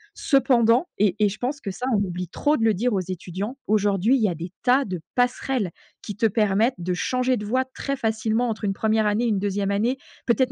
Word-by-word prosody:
Cependant- 250 0 +3
et 205 -2 +3
et 210 - +4
je 210 - -7
pense 275 +4 -2
que 195 - -4
ça, 250 +7 -5
on - - +3
oublie 180 -2 -4
trop 295 +8 +1
de 225 - -1
le 220 - +4
dire 235 +4 0
aux 190 - +1
étudiants- 185 - -5
aujourd'hui, 205 +3 +2
il 215 -5 +2
y - - -1
des 170 +3 -7
tas 260 +2 +4
de 180 -4 -5
passerelles, 245 -5 0 0.3
qui 205 - -6
te 230 - +1
permettent 215 +3 +2
de 180 +1 -2
changer 255 +7 0
de 210 - -5
voie 255 +4 +1
très 275 -1 -3
facilement 225 +1 0
entre 220 0 -5
une 195 - 0
1re 220 +1 +1
année 215 +4 +1
et - - +2
une 205 -3 +1
2e 200 0 -1
année, 230 +6 +1 0.3
peut-être 250 +1 +2
220 Hz, 230 wpm, -24 LUFS, 195-250 Hz, 0.3 s, et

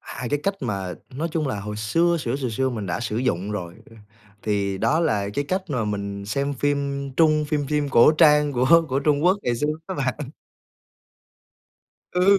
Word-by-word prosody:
2 120 - -6
cái 145 0 0
cách 200 0 0
mà 95 -7 -3 0.2
nói 165 +5 -2
chung 155 -3 -1
là 105 -5 -3
hồi 105 +1 -6
xưa 165 +11 +2
xửa 125 +1 -2
xừa 130 -3 -2
xưa 130 +4 0
mình 110 -5 -4
đã 85 - -2
sử 115 -2 -3
dụng 105 -5 -1
rồi, 90 -4 -5 0.2
ơ, 115 - -16 0.5
thì 100 -2 -1
đó 160 +3 +2
là 105 -10 0
cái 145 - -1
cách 185 +5 -1
mà 125 -6 0
mình 100 -1 -4
xem 140 +6 -1
phim 140 0 -1
Trung, 155 -2 +4
phim 145 -1 -1
phim 150 0 0
cổ 125 +2 +6
trang 150 -2 +4
của 145 +7 +4
của 130 +1 0
Trung 145 +1 +1
Quốc 185 +3 +4
ngày 120 -1 0
xưa 150 - -1 0.2
á 190 - -4
bạn. 135 0 -3 1.8
Ừ. 190 +2 +4
135 Hz, 200 wpm, -23 LUFS, 105-150 Hz, 1.8 s, cổ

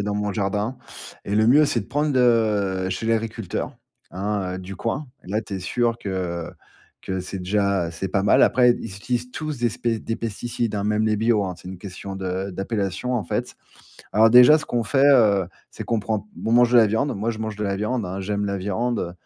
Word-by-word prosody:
a - - 0
dans 105 0 -2
mon 105 -1 -1
jardin, 105 +5 -2 0.5
et 100 - -1
le 110 +1 +4
mieux, 145 +5 +6
c'est 120 - 0
de - - -9
prendre, 145 -2 0
heu, 105 -6 +2
chez 95 +4 -3
l'agriculteur. 115 -3 -2 0.3
Hein, 95 -1 -2
heu, - - -5
du 95 +1 -8
coin, 135 +8 -3 0.2
et - - -13
là, 110 +2 0
tu 100 - -7
es - - -3
sûr 120 +4 0
que 90 -4 -4 0.5
que 95 -1 -3
c'est 95 +1 -6
déjà 95 -2 0
c'est 95 +3 -4
pas 100 - 0
mal. 100 - +4
Après, 125 -1 +5
ils 115 -4 -3
utilisent 125 +3 -3
tous 155 -2 -5
des 120 0 +2
spé 115 0 -2
des 115 +1 -4
pesticides, 115 0 -3
hein, 100 - -1
même 105 +1 +1
les 110 -1 +2
bio, 110 -2 +2
hein. 90 -1 -4
C'est 90 - -11
une 95 - -7
question 95 +1 -8
de 95 +1 -3
d'appellation, 100 +4 -3
en 115 - 0
fait. - - -3 0.6
Alors 110 +1 +5
déjà, 125 +5 +8
ce 155 - -4
qu'on 120 -1 -1
fait, 135 +5 +3
heu, 105 -9 +5 0.2
c'est - - -7
qu'on 115 -2 0
prend 105 0 -3 0.2
on 110 - 0
mange 120 0 +5
de - - +6
la 110 - +6
viande, 110 +7 0
moi, 105 +3 -3
je 110 - -6
mange 110 -1 -4
de 105 - -3
la 100 -1 -1
viande, 105 +1 -2
hein. 95 +2 -4
J'aime 100 +1 -2
la 100 0 -2
viande, 105 +6 -1
heu, 85 - -3
105 Hz, 230 wpm, -23 LUFS, 95-115 Hz, 0.6 s, déjà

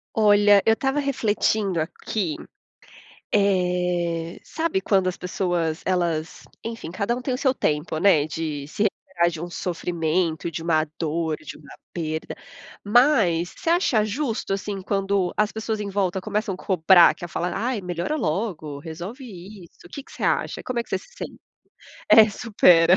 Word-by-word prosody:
Olha, 205 -1 +6
eu 225 - +6
estava 270 +4 -1
refletindo 215 - 0
aqui, 165 +2 -3 1.0
eh, 180 -4 0
sabe 320 -12 -1
quando 190 -2 +2
as 180 - -3
pessoas 175 -3 -1
elas 170 -3 -1 0.2
enfim, 230 -7 -6
cada 200 +6 -1
um 245 - -5
tem 255 0 -2
o - - -1
seu 265 -1 +2
tempo, 155 - -1
né, 165 -4 +4
de 155 -3 -4
se 205 +8 -1
recuperar 190 -4 0
de 165 -1 -7
um 175 - -5
sofrimento, 170 -1 -1
de 165 - -5
uma 160 -2 +2
dor, 160 -1 -1
de 155 - -10
uma 145 -3 -14 0.2
perda, 160 -2 -4 0.5
mas 205 - +3
você - - -6
acha 335 - +3
justo, 225 -3 -2
assim, 200 0 -4
quando 195 -1 0
as 210 0 +1
pessoas 220 -1 -3
em 205 -1 -4
volta 190 -2 0
começam 210 -1 -2
a - - -8
cobrar 180 -1 +5
que 175 - -7
a - - -15
fala: 175 +1 -2
"Ai, 230 +1 -2
melhora 180 - -2
logo, 155 - -2
resolve 175 - -8 0.4
isso". 170 - -21
O - - -14
que 280 - -7
que - - -18
você - - -9
acha? - - 0
Como 255 -1 -3
é - - +1
que - - -25
você - - 0
se - - -18
sente - - -8 0.7
É, 220 -1 +9
"supera". 180 -6 +5
185 Hz, 170 wpm, -24 LUFS, 165-215 Hz, 1.0 s, É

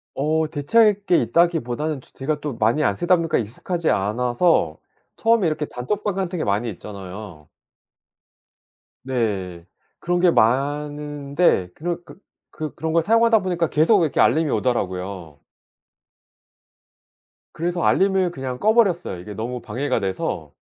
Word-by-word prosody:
어 155 +3 +1
대체할 205 +8 +3
게 180 - +4
있다기보다는 150 +1 0
조 - - -19
제가 150 +3 -2
또 145 -5 -4
많이 115 +8 +1
안 - - +1
쓰다 175 +1 +3
보니까 165 -2 0
익숙하지 155 - -2
않아서 120 - +1 0.4
처음에 225 -3 +2
이렇게 155 -1 -1
단톡방 195 +11 -3
같은 185 -2 -2
게 - - -1
많이 105 +4 0
있잖아요. 95 -4 -10 1.6
네. 100 -9 -2 0.3
그런 175 +1 0
게 175 -1 +5
많은데 145 - +1
그런 175 +2 -4 0.5
그 155 -2 -6
그런 160 0 -3
걸 165 - +4
사용하다 230 +4 +4
보니까 175 -4 -1
계속 170 +7 +4
이렇게 155 - -1
알림이 160 -1 +3
오더라고요. 95 - -2 2.1
그래서 175 +1 -2
알림을 190 -2 +2
그냥 130 -5 -5
꺼버렸어요 205 - +2
이게 105 +4 -8
너무 120 +3 -5
방해가 125 +3 -2
돼서. 95 -2 -3
150 Hz, 300 characters per minute, -22 LUFS, 110-175 Hz, 2.1 s, 게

